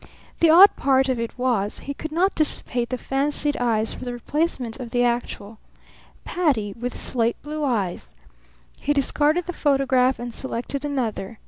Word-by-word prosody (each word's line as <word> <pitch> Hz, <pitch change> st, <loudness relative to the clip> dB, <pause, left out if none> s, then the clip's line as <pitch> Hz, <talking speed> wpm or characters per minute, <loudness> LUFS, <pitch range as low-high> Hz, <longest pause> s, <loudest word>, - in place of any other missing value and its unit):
The 335 Hz, -, +5 dB
odd 365 Hz, +6 st, +8 dB
part 265 Hz, -1 st, +2 dB
of 255 Hz, -2 st, 0 dB
it 230 Hz, +1 st, -4 dB
was, 235 Hz, -5 st, 0 dB
he 280 Hz, -, -5 dB
could 315 Hz, +2 st, -7 dB
not 365 Hz, +5 st, +2 dB
dissipate 245 Hz, -6 st, -1 dB
the 255 Hz, -, -2 dB
fancied 290 Hz, +3 st, -1 dB
eyes 225 Hz, -3 st, 0 dB
for -, -, -9 dB
the 245 Hz, -1 st, -4 dB
replacement 260 Hz, -2 st, -2 dB
of 245 Hz, -2 st, -6 dB
the 245 Hz, +1 st, +1 dB
actual. 235 Hz, -3 st, -2 dB, 0.7 s
Patti, 265 Hz, -, 0 dB
with 245 Hz, +3 st, -5 dB
slate 235 Hz, -2 st, +1 dB
blue 305 Hz, +1 st, -4 dB
eyes! 210 Hz, -10 st, -2 dB, 0.6 s
He 290 Hz, -, 0 dB
discarded 295 Hz, +4 st, +1 dB
the 355 Hz, -, -4 dB
photograph 265 Hz, -4 st, +2 dB
and 240 Hz, 0 st, -6 dB
selected 265 Hz, +3 st, -4 dB
another. 235 Hz, -7 st, -3 dB
260 Hz, 160 wpm, -23 LUFS, 235-290 Hz, 0.7 s, odd